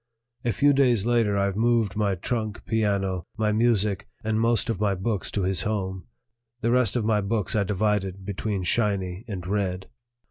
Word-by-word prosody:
A 120 - +1
few 145 +7 +4
days 125 -7 +3
later 115 -4 +2
I 100 0 +1
moved 115 -1 +1
my 105 -2 +1
trunk, 110 +3 -3
piano, 100 -5 0
my 110 -1 +1
music, 105 -3 +1 0.2
and 110 0 0
most 115 -2 +2
of 115 -5 -2
my 100 -2 +2
books 100 +2 -2
to 100 - -2
his 95 0 +1
home; 95 -3 -3 0.5
the 115 - +1
rest 125 -4 +3
of 120 -3 0
my 105 -2 +2
books 105 +1 -1
I 105 - +3
divided 100 -1 -1
between 100 0 -3
"Shiny" 95 -1 0
and 95 -5 -5
"Red." 95 -1 -2
105 Hz, 175 wpm, -25 LUFS, 95-115 Hz, 0.5 s, few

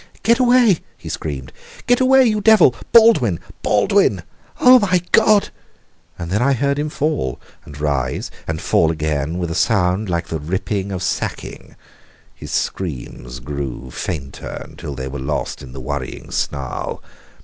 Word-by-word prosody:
"Get 235 +4 +4
away!" 245 -7 +4 0.2
he - - -9
screamed. 70 -5 -5 0.3
"Get 245 0 +3
away, 265 0 +6
you 215 -2 +1
devil! 210 - +6 0.2
Baldwin! 220 - +5 0.2
Baldwin! - - +2 0.4
Oh, 255 0 +8
my 185 -4 +2
God!" 215 -2 +4 0.7
And 85 0 -6
then 105 +4 +1
I 140 +2 +3
heard 140 +2 0
him 150 +1 -1
fall, 150 - -2 0.3
and 75 0 -11
rise, 70 -4 -2 0.2
and 80 0 -2
fall 80 - +2
again, 75 0 -2
with 85 -2 -3
a - - -1
sound 95 +1 +1
like 85 -1 -2
the 80 - -3
ripping 95 +5 -3
of 95 -2 -4
sacking. - - -4 0.6
His - - -10
screams 65 -7 -4
grew 65 -2 -6
fainter 70 -4 -6
until 70 - -8
they 65 0 -5
were 70 +1 -6
lost 70 +3 -3
in 65 - -10
the 65 - -8
worrying 65 0 -5
snarl. 70 -3 -3
85 Hz, 150 wpm, -19 LUFS, -, 0.7 s, Oh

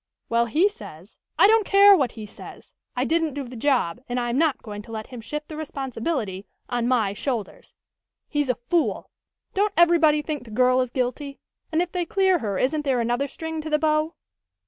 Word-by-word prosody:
"Well, 235 0 +2
he 320 - +3
says 200 - -11
" - - -55
"I - - +7
don't 440 +1 +5
care 400 +1 +7
what 270 -9 0
he 220 -2 -8
says. 210 - -13 0.2
I - - 0
didn't 325 -3 0
do 285 - -3
the 250 0 -10
job, 245 -5 0
and 245 +1 -1
I 240 -1 -2
am 245 - -1
not 315 -4 +1
going 205 -2 -7
to 225 - -13
let 220 -1 -5
him 250 -3 -9
shift 300 +6 -5
the 310 - -8
responsibility 265 - -4 0.2
on 240 -1 -1
my 225 -6 +2
shoulders. 250 - -5 0.5
He's 290 -3 -1
a 250 - +2
fool. 300 +8 -1 0.4
Don't 410 +1 +1
everybody 330 -3 +5
think 300 -3 -4
the 235 - -13
girl 255 +3 +3
is 255 - -2
guilty, 265 +3 -3 0.3
and 325 +2 +2
if 355 - -8
they 360 -2 -1
clear 380 0 +2
her 205 -6 -2
isn't 300 +7 +1
there 265 -4 +1
another 240 +4 0
string 320 +3 -5
to 315 - -6
the 305 - +3
bow?" 310 +1 +1
275 Hz, 210 wpm, -24 LUFS, 235-320 Hz, 0.5 s, I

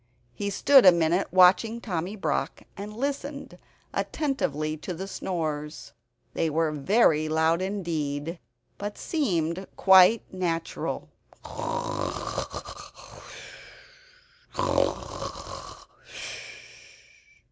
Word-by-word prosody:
He 200 +10 -3
stood 265 +6 +6
a 185 - +10
minute 170 +2 +2
watching 185 +5 +5
Tommy 185 -2 -3
Brock 205 - -2
and 205 +2 -6
listening 280 +2 -3 0.4
attentively 155 - -1
to 175 +3 -5
the 190 +4 -5
snores. 150 - -4 0.4
They 165 - 0
were 160 +1 +1
very 155 0 +3
loud 160 +2 +2
indeed, 165 -5 -3 0.4
but 205 0 -5
seemed 185 - -1
quite 190 +3 +7
natural. 170 -3 -2
180 Hz, 75 wpm, -27 LUFS, 160-205 Hz, 0.4 s, a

